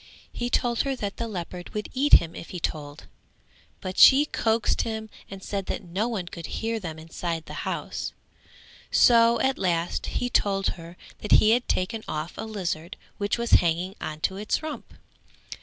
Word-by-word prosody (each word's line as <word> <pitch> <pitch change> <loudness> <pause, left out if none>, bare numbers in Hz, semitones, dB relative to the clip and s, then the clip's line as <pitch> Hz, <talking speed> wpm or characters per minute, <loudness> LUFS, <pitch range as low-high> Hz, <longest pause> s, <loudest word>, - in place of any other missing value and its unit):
He 240 0 -2
told 240 -1 +1
her 275 -1 +1
that 205 -5 -4
the 230 - -3
leopard 180 -3 -7
would 210 - -2
eat 280 +3 +1
him 165 -1 +7
if - - -8
he 180 - -5
told, 145 -2 -4 0.8
but 185 0 -4
she 280 +2 +9
coaxed 225 -6 +1
him 220 -1 -4 0.2
and 195 -1 -9
said 195 -2 -3
that - - -3
no 190 +6 -2
one 215 -7 -3
could 170 -2 -8
hear 225 0 -2
them 165 -5 -6
inside 165 +1 -4
the - - -5
house; - - -4 0.8
so 235 -1 +5
at 265 0 +1
last 170 -2 0
he 245 - -1
told 195 -5 +1
her 170 +1 -9 0.2
that 210 - 0
he 215 - +6
had 245 +2 +2
taken 215 +4 -1
off 155 +3 -4
a 220 - -5
lizard 175 -5 -4 0.2
which 205 +2 0
was 235 0 -3
hanging 175 +2 0
on 155 0 -5
to 190 - 0
its 210 +8 -1
rump. 310 -1 -7
200 Hz, 180 wpm, -26 LUFS, 170-230 Hz, 0.8 s, she